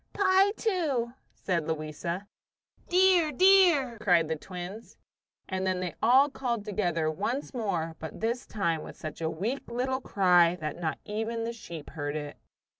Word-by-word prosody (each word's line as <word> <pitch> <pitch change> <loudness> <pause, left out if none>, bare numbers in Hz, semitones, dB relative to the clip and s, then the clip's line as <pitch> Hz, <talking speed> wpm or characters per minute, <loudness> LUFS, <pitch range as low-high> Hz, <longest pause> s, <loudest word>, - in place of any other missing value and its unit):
"Pie, 385 0 +4
too," 310 - -1 0.2
said 170 -5 -2
Louisa. 160 +4 -4 0.6
"Dear, 360 -3 +4
dear!" 335 - +5
cried 175 -6 +3
the 160 - 0
twins. 180 +6 -8 0.5
And 190 0 -2
then 185 -1 0
they 180 -1 -3
all 260 +5 +6
called 240 -6 -3
together 175 -7 0
once 235 - -3
more, 175 -9 -2
but 160 -2 -7
this 235 +3 -2
time 170 -7 -1
with - - -10
such 155 +1 -7
a 160 - 0
weak 215 +13 -3
little 260 +2 -1
cry 180 -6 +4
that 155 -1 -4
not 160 -3 -2
even 225 +2 -3
the 230 +1 -3
sheep 170 -9 -9
heard 145 -1 -4
it. 145 -1 -5
205 Hz, 155 wpm, -28 LUFS, 165-260 Hz, 0.6 s, all